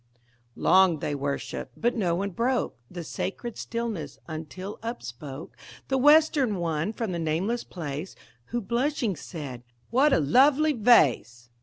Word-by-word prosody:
Long 185 -3 +4
they 145 - -3
worshipped; 140 0 -4
but 240 +2 +1
no 180 -7 +1
one 200 +3 -2
broke 245 +6 0
The 175 -1 -6
sacred 225 +8 -4
stillness, 210 - -4
until 165 +5 -7
upspoke 150 - -7 0.4
The 265 - +2
Western 295 -5 +5
one 165 +1 -1
from 225 -3 -3
the 170 - -3
nameless 175 +9 -1
place, 155 0 -6 0.3
Who, 240 +1 -3
blushing, 235 0 0
said: 140 -6 -7 0.3
"What 275 +5 +4
a - - +4
lovely 275 - +4
vase!" 130 - +3
190 Hz, 135 wpm, -27 LUFS, 155-240 Hz, 0.4 s, Western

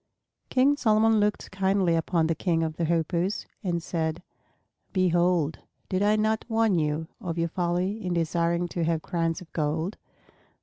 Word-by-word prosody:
King 270 +3 +3
Solomon 220 -2 +4
looked 210 0 0
kindly 190 -2 +2
upon 165 0 +1
the 165 - +1
King 165 -1 0
of 155 -1 -3
the 170 - 0
Hoopoes 170 +4 0 0.2
and 170 -3 -1
said, 165 0 -2 0.7
"Behold, 175 -4 +2 0.3
did 185 -1 0
I 210 +1 +4
not 220 +1 +1
warn 225 -5 +2
you 155 +1 -1
of 170 -2 -4
your 165 0 0
folly 180 +5 -1
in 180 -1 -1
desiring 170 +1 0
to 170 - -2
have 160 -1 0
crowns 165 -2 -1
of 175 - -14
gold? 160 +5 -1
175 Hz, 160 wpm, -27 LUFS, 165-195 Hz, 0.7 s, Solomon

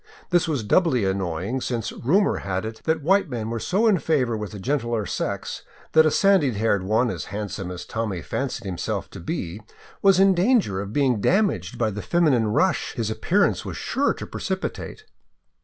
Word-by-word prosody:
This 175 -2 +3
was 145 -8 -1
doubly 125 - +2
annoying, 95 +5 -2
since 120 -3 -2
rumor 190 - +2
had 95 +1 -3
it 110 0 -7
that 160 -2 0
white 195 +2 +3
men 115 -3 -4
were 115 - -2
so 195 - +1
in 210 -6 +4
favor 130 -8 +1
with 105 -2 -4
the 105 - -7
gentler 120 -1 -1
sex - - -3 0.3
that 160 0 +6
a - - +4
sandy 185 -7 +3
haired 105 -2 +1
one 110 +5 +1
as - - -5
handsome 100 -2 -5
as 90 -1 -7
Tommy 105 -6 -3
fancied 135 -3 -3
himself 90 -3 -3
to - - -9
be 90 +6 -4 0.4
was 195 -2 +5
in 195 0 +6
danger 185 - +2
of 100 0 -6
being 125 -4 +1
damaged 175 - +1
by 110 -2 +1
the 105 +1 -5
feminine 150 -10 +2
rush 180 - +1
his 115 -4 -2
appearance 175 - +1
was - - -6
sure 280 +2 0
to - - -7
pre - - -8
cipitate. 190 - -4
120 Hz, 190 wpm, -24 LUFS, 105-175 Hz, 0.4 s, that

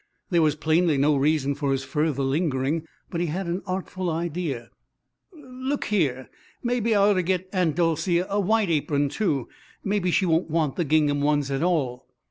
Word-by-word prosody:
There 170 -2 +4
was 155 -2 +3
plainly 160 0 +2
no 145 +2 +3
reason 140 0 +1
for 140 -1 -2
his 135 0 0
further 150 -1 -1
lingering. 145 +2 0 0.2
But 170 - -2
he 175 - 0
had 180 +5 -3
an 175 +3 -2
artful 185 -1 -3
idea. 160 -7 -3 0.6
"Look 265 -3 -5
here 140 -11 0 0.4
maybe 240 -2 +1
I 200 0 +5
ought - - +4
to 185 - +1
get 185 +1 -1
Aunt 175 -6 +1
Dolcey 170 +1 +1
a 195 +3 -1
white 205 -1 +2
apron, 145 -2 +1
too. 145 - -1 0.4
Maybe 195 -2 0
she 185 +2 +2
won't 165 0 +1
want 155 -3 0
the 175 - -1
gingham 145 -1 +2
ones 145 -1 +1
at 135 +1 -1
all." 155 -8 0
165 Hz, 180 wpm, -25 LUFS, 145-185 Hz, 0.6 s, I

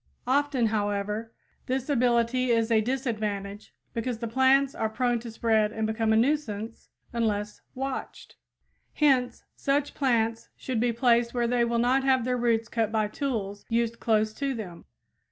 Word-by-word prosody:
Often, 270 -1 +2
however, 210 +1 -1 0.4
this 260 0 -1
ability 250 -2 +2
is 230 -1 +2
a 220 -1 +4
disadvantage, 215 -5 -3 0.2
because 230 0 -2
the 230 +1 -4
plants 265 +3 +3
are 220 - -1
prone 240 +1 0
to 235 +1 -8
spread 220 -1 +1
and 220 0 -2
become 220 0 0
a - - +4
nuisance 230 -4 -1 0.2
unless 210 -3 -1
watched. 270 +1 -5 0.6
Hence 255 -5 +2
such 280 +1 0
plants 230 -4 0
should 255 -4 -3
be 240 +1 +2
placed 235 0 +2
where 240 -1 +1
they 240 0 +2
will 235 0 0
not 250 +3 +2
have 260 -3 +2
their 250 0 0
roots 230 -2 +1
cut 225 -2 -1
by 215 -2 0
tools 210 -6 -3
used 230 0 0
close 215 -1 +1
to 275 +2 -2
them. 185 -7 -8
235 Hz, 155 wpm, -27 LUFS, 220-255 Hz, 0.6 s, a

